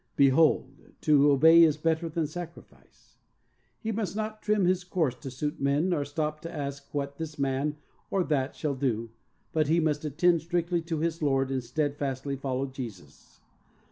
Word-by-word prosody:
"Behold, 140 +3 +3 0.2
to 145 -1 +5
obey 160 +4 +7
is 155 -3 +5
better 165 +1 0
than 160 0 -1
sacrifice." 170 +2 -11 0.6
He 225 - -3
must 210 -2 -3
not 215 0 -4
trim 210 -3 +2
his 180 0 +2
course 170 -7 0
to 130 +2 -8
suit 150 +4 -4
men, 140 +6 +2
nor 160 -5 +1
stop 150 +1 -3
to 165 - -7
ask 140 -2 -6
what 140 0 -4
this 155 -2 -5
man 140 +2 -1 0.3
or 195 -2 +1
that 140 -4 -1
shall 150 -3 -2
do, 115 -4 -2 0.4
but 155 -2 +2
he 165 +3 +3
must 155 -2 0
attend 165 +3 +2
strictly 175 0 -1
to 165 -2 -3
his 165 0 -1
Lord 135 -2 +1
and 130 -2 -1
steadfastly 140 +1 -2
follow 135 0 -2
Jesus. 115 - -10
150 Hz, 170 wpm, -28 LUFS, 140-165 Hz, 0.6 s, obey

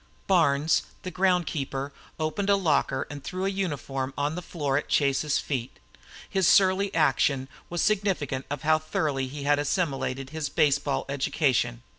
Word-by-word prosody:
Barnes, 160 -4 +3 0.2
the 185 - -5
ground 180 -1 +2
keeper, 140 -1 -4 0.3
opened 160 +6 -1
a 200 - +6
locker 160 -8 +1
and 145 -1 -8
threw 185 +1 -3
a - - +2
uniform 140 -8 -3
on 145 +1 0
the 180 - -4
floor 145 -6 -2
at 145 - -1
Chase's 140 +1 +2
feet. 130 -4 -3 0.5
His 190 -3 +1
surly 195 +1 +4
action 140 -3 +2 0.2
was 175 0 -1
significant 190 -11 0
of 145 -1 -4
how 155 0 +4
thoroughly 145 -4 -1
he 140 +2 -7
had 145 +1 +3
assimilated 135 -4 -1
his 155 -2 -3
baseball 145 -3 +1
education. 130 -3 0
145 Hz, 155 wpm, -27 LUFS, 135-180 Hz, 0.5 s, a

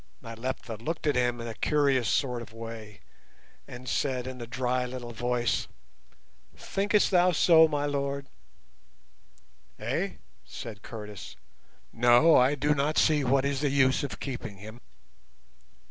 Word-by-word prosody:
Nyleptha 115 0 -5
looked 160 +10 -4
at 145 -3 +2
him 120 -1 +1
in 115 - -5
a 115 - -5
curious 140 -2 +1
sort 125 -4 0
of 110 -2 -11
way, 115 -2 -9 0.7
and 125 0 -10
said 125 +1 -1
in 130 -1 -7
a 120 - -6
dry 125 +1 -1
little 125 -1 -6
voice, 120 -1 -1 0.9
"Thinkest 205 +1 +1
thou 180 0 +4
so, 160 -1 +6
my 145 -2 -1
lord?" 140 -1 -2 1.5
"Eh?" - - -2 0.3
said 105 - -9
Curtis. 105 -3 -9 0.6
"No, 120 +7 +5
I 130 +3 +4
do 145 +2 +1
not 145 +2 0
see 150 -2 +3
what 135 +1 +2
is 140 -1 -1
the 145 - +1
use 130 -1 +3
of 140 - -5
keeping 120 -7 -6
him." 110 +4 -11
125 Hz, 140 wpm, -28 LUFS, 120-145 Hz, 1.5 s, so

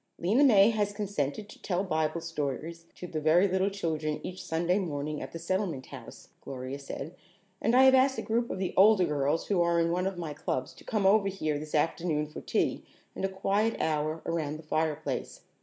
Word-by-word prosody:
"Lena 210 +11 +3
May 215 -5 +6
has 205 -2 -1
consented 200 -4 -3
to - - -14
tell 185 0 -1
Bible 160 -2 -1
stories 165 +1 -4
to - - -8
the 155 -3 -4
very 165 +5 +4
little 190 +1 +1
children 160 -6 -2
each 185 0 -6
Sunday 170 +4 0
morning 150 -4 -3
at - - -7
the - - -6
Settlement 170 -5 -2
House," - - -11
Gloria 130 +1 -6
said, 140 +3 -7 0.5
"and 230 - +2
I 260 - +7
have 265 0 +7
asked 265 +1 +4
a - - -3
group 235 +2 0
of - - -3
the 185 -1 -2
older 200 -1 +6
girls 150 0 0
who 195 -4 +1
are 170 0 +2
in 165 0 +2
one 180 +2 0
of 195 -2 -4
my 165 -4 -4
clubs 130 -3 -3
to - - -16
come 210 -3 -1
over 200 +1 +5
here 155 -6 -2
this 155 +1 -6
afternoon 155 0 0
for 150 - -9
tea - - -1 0.3
and - - -5
a 195 - +1
quiet 200 +4 0
hour 155 +1 -1
around 155 -3 -2
the 160 - -12
fireplace. 155 -3 -2
170 Hz, 205 wpm, -29 LUFS, 155-195 Hz, 0.5 s, I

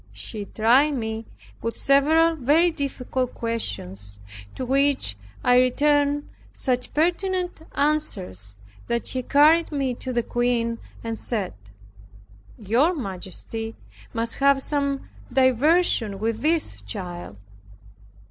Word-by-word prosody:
He 200 - -6
tried 250 +9 +3
me 220 -2 -4 0.3
with 230 - -3
several 315 +4 +4
very 315 +5 +3
difficult 260 -4 -3
questions, 100 - -4 0.4
to 260 - -4
which 275 - +3 0.3
I 250 0 +5
returned 290 +3 +2 0.3
such 250 -2 -1
pertinent 355 +2 0
answers 190 - -1 0.3
that 235 0 -1
he 255 - -2
carried 305 +6 +4
me 275 -4 -1
to 255 +2 -5
the 240 -1 0
Queen, 235 -1 0 0.2
and 225 -1 -4
said, 210 -6 -3 1.0
"Your 245 - +2
majesty 225 - -6 0.4
must 230 -1 -3
have 275 -1 +3
some 280 -2 -1 0.2
diversion 260 - +3
with 220 +2 -2
this 305 - 0
child." 175 - -7
255 Hz, 110 wpm, -24 LUFS, 225-290 Hz, 1.0 s, I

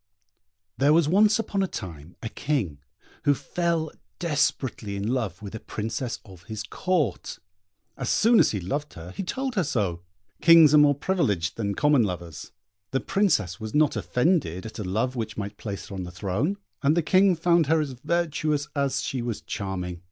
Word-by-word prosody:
There 140 +2 +5
was 165 -2 +4
once 210 +5 +4
upon 205 -3 -1
a 190 - +1
time 85 - -8
a 115 - -3
King, 115 - -2 0.5
who 145 - +5
fell 170 0 -1 0.3
desperately 140 -9 -1
in 100 +1 -3
love 110 -7 -2
with 100 - -7
a 110 - -5
Princess 115 +4 -4
of 95 -4 -14
his 110 -1 -5
Court. 165 - -1 0.6
As 125 -3 -3
soon 230 +1 +5
as - - +5
he 105 - -2
loved 145 - -3
her 85 +2 -9
he - - -5
told 260 +7 -3
her 190 -6 +1
so. 100 - -1 0.4
Kings 165 -3 +8
are 150 - +8
more 145 -1 +5
privileged 110 - 0
than 100 -3 -2
common 145 -3 +4
lovers. 85 -5 -4 0.4
The 135 - 0
Princess 155 - +1
was 110 +2 -6
not 150 -1 +3
offended 125 - 0
at 110 +1 -8
a - - -2
love 110 +8 -1
which 110 -3 -4
might 100 0 -5
place 100 -3 -6
her - - -8
on 95 - -4
the 90 - -6
throne, 105 - -1 0.2
and 150 +3 +3
the 170 - +3
King 185 +4 +4
found 170 -1 +3
her 160 +1 +3
as 150 -3 -2
virtuous 155 +1 -1
as 140 -2 0
she 130 - -2
was 120 -2 -3
charming. 90 -3 -4
130 Hz, 185 wpm, -26 LUFS, 100-160 Hz, 0.6 s, Kings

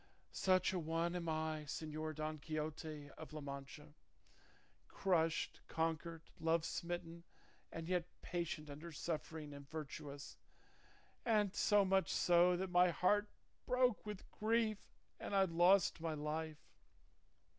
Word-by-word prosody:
Such 185 -1 +3
a 185 - 0
one 165 +2 0
am 170 -2 -2
I, 155 -1 -1
Señor 155 +1 -4
Don 155 0 -3
Quixote 155 -1 -4
of 160 -1 -9
La 155 - -4
Mancha, 140 +1 -8 0.9
crushed, 165 -4 +1
conquered, 165 0 -1 0.2
love 165 0 +2
smitten, 170 -1 -4 0.5
but 165 0 -5
yet 180 -1 +1 0.2
patient 170 -3 -3
under 150 +4 -8
suffering 155 -1 -4
and 140 -1 -10
virtuous, 150 -2 -7 0.8
and 210 -4 +3
so 205 -1 +4
much 190 0 +3
so 175 0 +5
that 185 0 -2
my 180 0 +6
heart 205 +5 +3 0.4
broke 250 -3 +3
with 210 -2 -7
grief 220 -1 0 0.3
and 200 - -3
I 195 - +6
lost 175 0 +4
my 165 -1 -1
life. 155 +1 -3
165 Hz, 125 wpm, -39 LUFS, 155-180 Hz, 0.9 s, my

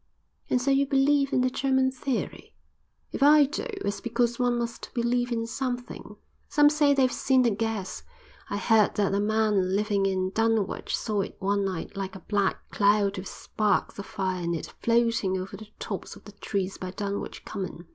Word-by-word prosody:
"And 250 - +2
so 265 +3 +1
you 275 0 +3
believe 275 +1 +3
in 255 - +2
the 255 - +2
German 265 0 +2
theory?" 260 0 -4 0.6
"If - - -5
I 295 +1 +7
do, 300 - -4 0.2
it's 200 0 -2
because 235 0 0
one 245 -1 +2
must 235 -1 -4
believe 245 +1 0
in 230 -1 -1
something. 245 0 -5 0.3
Some 295 0 +5
say 295 -2 +3
they've 260 -2 +3
seen 260 -1 +2
the 235 - +3
gas. 220 -2 -3 0.5
I 200 - -2
heard 220 0 +3
that 200 -2 +1
a 200 - +2
man 210 -3 +1
living 200 -1 +1
in 185 -1 -1
Dunwich 225 -2 0
saw 210 -3 -1
it - - -6
one 200 +1 0
night 185 +1 -4
like 195 -1 -4
a - - -7
black 200 +1 -1
cloud 200 -1 +2
with 185 - -7
sparks 210 +1 -1
of 200 - -6
fire 185 -3 -2
in 170 0 -1
it 160 - -6
floating 230 -5 +2
over 185 +2 -6
the 215 +2 -10
tops - - -6
of - - -15
the - - -10
trees 195 -1 -3
by 185 - -5
Dunwich 200 +2 -5
Common." 185 -2 -6
220 Hz, 185 wpm, -27 LUFS, 195-250 Hz, 0.6 s, I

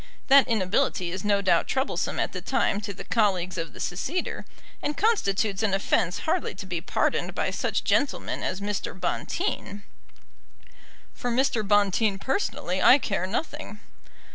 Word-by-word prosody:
That 275 0 +7
inability 200 -3 +1
is 185 0 -5
no 200 -1 +2
doubt 170 -3 +3
troublesome 265 +1 -1
at - - 0
the - - -5
time 205 - 0
to 205 -1 -4
the 195 - -8
colleagues 185 -6 +1
of 165 - -4
the - - -13
seceder, 275 - -3 0.4
and 295 - -2
constitutes 210 - +1
an 205 -3 +2
offence 190 -2 +1
hardly 330 - -1
to 190 - -7
be 175 -3 -3
pardoned - - 0
by - - 0
such - - -1
gentlemen 285 - 0
as 185 +2 -3
Mr. 200 -2 -3
Bonteen." 200 +2 -2 1.3
"For 245 - -4
Mr. 240 -1 +1
Bonteen 205 0 +2
personally 195 - -2
I 260 - +8
care 195 -8 -2
nothing." 240 0 -4
205 Hz, 150 wpm, -26 LUFS, 190-250 Hz, 1.3 s, I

